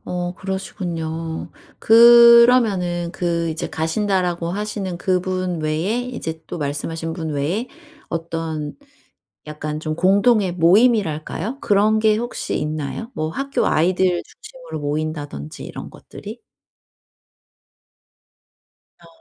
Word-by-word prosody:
어 180 0 -3
그러시군요. 165 -4 -5 0.3
그러면은 235 -6 +6
그 170 -2 -1
이제 155 - -4
가신다라고 175 0 -1
하시는 195 -1 -4
그분 185 -1 -1
외에 160 +10 -1
이제 200 -11 -6
또 - - -6
말씀하신 160 +2 -3
분 160 -2 -5
외에 160 - -2 0.4
어떤 165 -2 -4 0.7
약간 150 0 -5
좀 155 -1 -3
공동의 200 +2 +3
모임이랄까요, 190 - +2
그런 210 +1 +3
게 215 0 +3
혹시 240 +2 -3
있나요? 155 - -4
뭐 155 0 -2
학교 275 +10 -1
아이들 180 +2 +2
중심으로 - - -10
모인다든지 145 - -4
이런 - - -8
것들이? - - -11 2.6
어. 170 - -18
175 Hz, 245 characters per minute, -21 LUFS, 160-210 Hz, 2.6 s, 그러면은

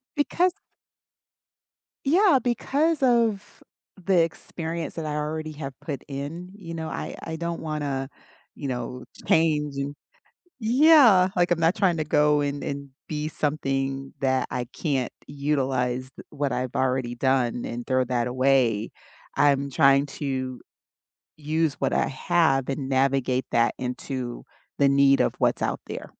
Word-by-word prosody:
Because 350 +5 +1 1.5
Yeah, 355 -1 +5
because 280 +6 0
of 230 -5 +1 0.4
the 190 -3 +4
experience 165 0 -5
that 165 - -5
I 150 - -2
already 155 +1 -3
have 140 -2 -6
put 140 -5 -5
in, 150 +6 -6
you 170 -5 -8
know, 160 -1 -4
I - - -5
I 160 - -4
don't 170 0 -4
wanna, 145 -4 -3 0.4
you 140 - -6
know, 125 0 -4 0.2
change, 150 -3 +2
and 140 +1 -3 0.7
Yeah, 240 - +6
like, 175 0 +2
I'm 175 - +2
not 165 +3 +3
tryna 175 -7 +1
go 150 -1 +3
and 145 0 -3
and 140 -1 -5 0.2
be 150 0 -2
something 135 -3 -2
that 130 -1 +1
I 125 -1 -3
can't 135 -6 -1 0.2
utilized 130 -3 -1 0.2
what 145 -3 -2
I've 125 -1 -3
already 130 -2 0
done 125 -1 +1
and 120 0 -5
throw 130 0 +2
that 120 -1 -1
away. 125 -4 +2 0.5
I'm 140 -1 +3
trying 140 0 +4 0.2
to 130 -3 -3 0.8
use 155 0 0
what - - 0
I - - +2
have 140 -2 +1
and 135 0 -3
navigate 130 -1 +1
that 115 0 +2
into 125 -1 -5 0.3
the 140 -1 +5
need 140 0 +4
of - - +2
what's - - +1
out - - -1
there. - - -7
140 Hz, 140 wpm, -25 LUFS, 130-165 Hz, 1.5 s, Yeah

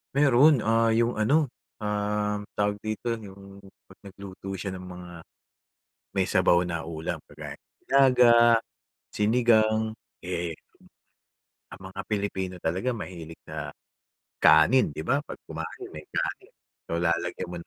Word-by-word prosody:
Meron. 140 -1 +5
Ah, 115 0 +3
yung 115 0 +1
ano, 140 +5 +2 0.3
um, 105 0 -1 0.2
tawag 105 0 0
dito, 110 +2 -3
yung 100 -1 -12 0.2
'pag 95 - -19
nagluto 95 0 -8
siya 95 +1 -4
ng 90 - -9
mga 90 -1 -9 1.0
may - - 0
sabaw 85 - +4
na 85 -2 -3
ulam 80 -1 -5
kagaya - - -9
ng - - -35 0.2
nilaga, 125 -3 +6 0.8
sinigang, 110 0 +3 0.3
eh. 85 -2 -3 1.2
Ang 95 - -14
mga 95 - -6
pilipino 100 -3 -2
talaga 90 +10 -1
mahilig 85 -8 -7
na - - -5 0.7
kanin, 80 - +5
'di 80 - -4
ba? 140 - +1
'Pag - - -8
kumain, - - -7
may 75 0 -10
kanin. - - -4 0.3
So, 85 +1 -2
lalagyan 85 +1 -1
mo 90 - -6
ng 85 - -11
105 Hz, 135 wpm, -27 LUFS, 90-115 Hz, 1.2 s, nilaga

